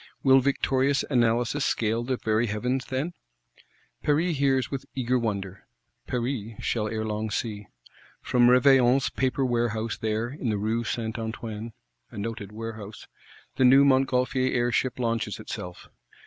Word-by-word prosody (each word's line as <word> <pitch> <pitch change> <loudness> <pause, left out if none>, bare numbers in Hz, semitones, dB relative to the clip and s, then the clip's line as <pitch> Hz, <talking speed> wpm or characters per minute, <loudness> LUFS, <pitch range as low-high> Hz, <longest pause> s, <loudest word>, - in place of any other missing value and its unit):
Will 135 -1 +6
victorious 135 0 +1
Analysis 120 +2 +2
scale 115 -4 0
the 130 +1 -1
very 110 +1 0
Heavens, 125 +5 -1
then? 135 +7 -3 0.9
Paris 155 +2 +1
hears 135 -2 +1
with 135 -2 -5
eager 125 -1 +1
wonder; 100 -4 -4 0.4
Paris 120 -3 -3
shall 110 -2 -1
ere 110 0 -3
long 110 0 -2
see. 105 -2 -4 0.6
From 120 -1 +4
Reveilion's 130 0 +5
Paper 130 +1 0
warehouse 115 -2 -1
there, 110 +2 -1
in 135 -2 -4
the 105 - 0
Rue 110 +3 -1
St. 115 0 -3
Antoine 110 0 -5 0.4
(a - - -12
noted 105 -1 -5
Warehouse),—the 110 +3 -7
new 135 +2 +7
Montgolfier 130 -1 +2
air 120 0 +1
ship 130 +1 0
launches 115 -3 -2
itself. 90 0 -7
120 Hz, 135 wpm, -26 LUFS, 110-130 Hz, 0.9 s, new